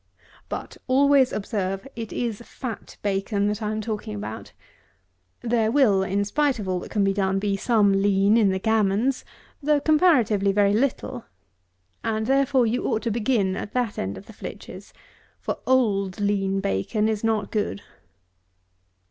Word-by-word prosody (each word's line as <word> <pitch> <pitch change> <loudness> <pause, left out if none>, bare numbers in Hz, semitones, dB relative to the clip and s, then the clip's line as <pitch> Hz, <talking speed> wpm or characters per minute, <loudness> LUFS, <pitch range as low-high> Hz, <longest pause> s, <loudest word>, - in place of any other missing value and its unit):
But - - -6
always 270 0 +4
observe, 195 +1 -3
it 225 -2 -6
is 235 -3 -3
fat 235 -2 -8
bacon 200 +1 0
that 210 +1 -3
I 210 - -1
am 215 0 -2
talking 210 - -4
about. 105 +1 -7 0.9
There 230 -2 +1
will, 230 -8 +4
in 195 +1 0
spite 285 +5 +1
of 205 -3 -5
all 185 -1 0
that - - -9
can 205 - +1
be 195 0 +2
done, 195 -1 0
be 200 0 0
some 205 -1 +3
lean 200 +1 +3
in 220 -4 +4
the 190 - 0
gammons, 220 +4 +1 0.4
though 295 0 +2
comparatively 265 - +3
very 200 0 +3
little; 250 0 -1 0.8
and 220 -1 -1
therefore 270 0 +3
you 230 +2 -1
ought 220 -3 0
to 230 - -1
begin 210 -4 +1
at 205 - -6
that 245 -4 -1
end 95 +1 -3
of 95 - -11
the - - -13
flitches; - - -9 0.5
for, - - -4
old 210 -7 +1
lean 195 -1 0
bacon 100 - 0
is 220 -1 -2
not 220 -3 0
good. 205 - -2
210 Hz, 160 wpm, -24 LUFS, 195-240 Hz, 0.9 s, always